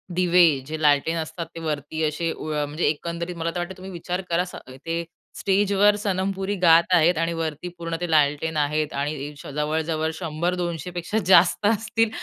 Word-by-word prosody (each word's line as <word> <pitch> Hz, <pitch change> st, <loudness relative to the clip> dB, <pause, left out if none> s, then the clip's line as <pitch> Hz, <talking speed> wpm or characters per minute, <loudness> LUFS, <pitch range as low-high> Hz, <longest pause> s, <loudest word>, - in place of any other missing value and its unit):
दिवे 180 Hz, 0 st, +5 dB, 0.2 s
जे 155 Hz, +1 st, -5 dB
लालटेन 150 Hz, +2 st, +3 dB
असतात 165 Hz, +1 st, -4 dB
ते -, -, -5 dB
वरती 155 Hz, 0 st, -3 dB
असे, 165 Hz, +2 st, -2 dB
व 150 Hz, -1 st, -3 dB
म्हणजे 150 Hz, +4 st, -2 dB
एकंदरीत 170 Hz, +3 st, -3 dB
मला 165 Hz, 0 st, -2 dB
तर -, -, -1 dB
वाटतं 180 Hz, +2 st, -5 dB
तुम्ही 190 Hz, +1 st, -9 dB
विचार 180 Hz, +1 st, -4 dB
करा, 170 Hz, +1 st, +2 dB
स 180 Hz, -, -10 dB, 0.3 s
ते 165 Hz, +1 st, -2 dB, 0.4 s
स्टेजवर 200 Hz, +1 st, +3 dB
सनम 195 Hz, -2 st, -1 dB
पुरी 195 Hz, +2 st, -2 dB
गात 165 Hz, -1 st, +7 dB
आहेत 170 Hz, 0 st, +4 dB
आणि 165 Hz, +1 st, 0 dB
वरती 165 Hz, 0 st, -4 dB
पूर्ण 165 Hz, -1 st, -4 dB
ते 175 Hz, -, -2 dB
लालटेन 150 Hz, +1 st, +2 dB
आहेत 150 Hz, +1 st, 0 dB
आणि 145 Hz, 0 st, -3 dB
श -, -, -10 dB
जवळ-जवळ 155 Hz, +1 st, -1 dB
100-200 175 Hz, +1 st, -2 dB
पेक्षा 175 Hz, +4 st, -3 dB
जास्त 185 Hz, +2 st, +5 dB
असतील 225 Hz, +1 st, +1 dB
170 Hz, 175 wpm, -24 LUFS, 155-180 Hz, 0.4 s, गात